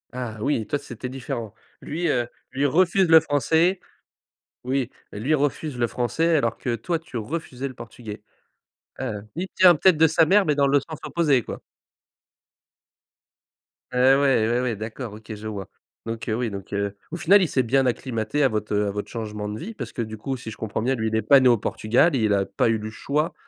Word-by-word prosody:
Ah 120 -3 -5
oui, 125 -5 0
toi, 145 - 0
c'était 125 -1 -7
différent. 120 -4 -5 0.3
Lui, 165 +3 -3
heu, 120 -5 +1 0.2
lui 135 +2 0
refuse 185 +5 +3
le 160 0 +9
français. 160 +5 +2 0.9
Oui. 130 -1 -1 0.2
Lui 115 +9 -2
refuse 145 -1 -1
le 120 - +2
français 125 +9 0
alors 115 -6 0
que 120 -2 -2
toi, 170 +6 -2
tu 160 -6 -11
refusais 135 +2 -4
le 130 - -11
portugais. 110 -2 -9 0.8
Heu, 105 -1 -4
il 185 +2 -3
tient 185 -2 +7
peut-être 180 +2 +4
de 160 - +6
sa 160 +1 +4
mère 200 +1 +5
mais 150 - +2
dans 140 -1 +3
le 140 +1 +4
sens 155 +2 -9
opposé, 150 -7 +2
quoi. - - -7 2.3
Ouais, 130 +2 +5
ouais, 135 -5 +3
ouais, 120 +1 +1
ouais, 125 -3 -1
d'accord, 110 +2 -6
OK, 110 0 -9
je 105 +1 -8
vois. 100 -3 -6 0.4
Donc, 115 0 -5
heu, 110 - 0
oui 120 0 -1
donc, 100 -1 -8
heu, 100 0 -2 0.2
au - - -3
final, 195 +4 +5
il - - +1
s'est 130 -4 +1
bien 135 +3 +2
acclimaté 125 +1 -1
à - - +6
votre, 105 -2 -3
heu, 105 0 +1
à - - -1
votre 105 +1 -5
changement 105 -2 -5
de 105 +1 -5
vie 220 +6 -6
parce - - -7
que 120 - -3
du 110 -1 -5
coup, 135 +5 -3
si 120 -3 -8
je 100 - -10
comprends 110 0 -3
bien, 130 +3 +1
lui, 110 -1 -2
il 110 - -2
est 110 - +2
pas 135 +6 +6
né 130 - +4
au 120 -2 +5
Portugal, 125 +10 +2
il 110 -4 +2
a 100 -1 +2
pas - - 0
eu 115 - +2
le 110 - -5
choix 150 +7 -2
125 Hz, 215 wpm, -24 LUFS, 110-150 Hz, 2.3 s, le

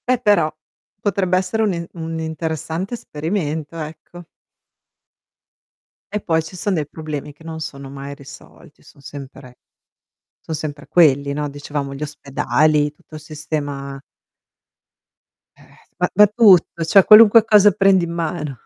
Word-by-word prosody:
Beh 255 -1 +2
però 205 -9 +2 0.5
potrebbe 195 -3 0
essere 190 +4 -1
un 205 -3 +1
e 170 -1 -5
un 165 -1 -5
interessante 160 - -4
esperimento, 160 -4 -4
ecco. 160 +2 -9 1.9
E 210 - -1
poi 160 -4 0
ci 165 +3 -10
son 205 +2 -1
dei 155 -4 -1
problemi 150 -2 -6
che 145 +3 -19
non 160 -1 -7
sono 140 -3 -7
mai 140 +1 -8
risolti, 145 +2 -15
son 145 - -19
sempre 135 -2 -11 0.8
son 160 - -7
sempre 150 -1 -6
quelli, 140 -4 +3
no. 150 +1 -3
Dicevamo 145 -1 -5
gli 140 - -9
ospedali, 150 +1 0
tutto 155 +1 -15
il - - -9
sistema 145 -2 -6 1.6
Eh, - - -22
eh, - - -22 0.2
ma 180 - 0
ma 210 +2 +7
tutto, 195 -6 +4
cioè 190 +4 +5
qualunque 215 +2 +8
cosa 210 -2 +6
prendi 195 -2 +3
in 170 - -6
mano, 160 -5 -4
160 Hz, 140 wpm, -19 LUFS, 145-185 Hz, 1.9 s, qualunque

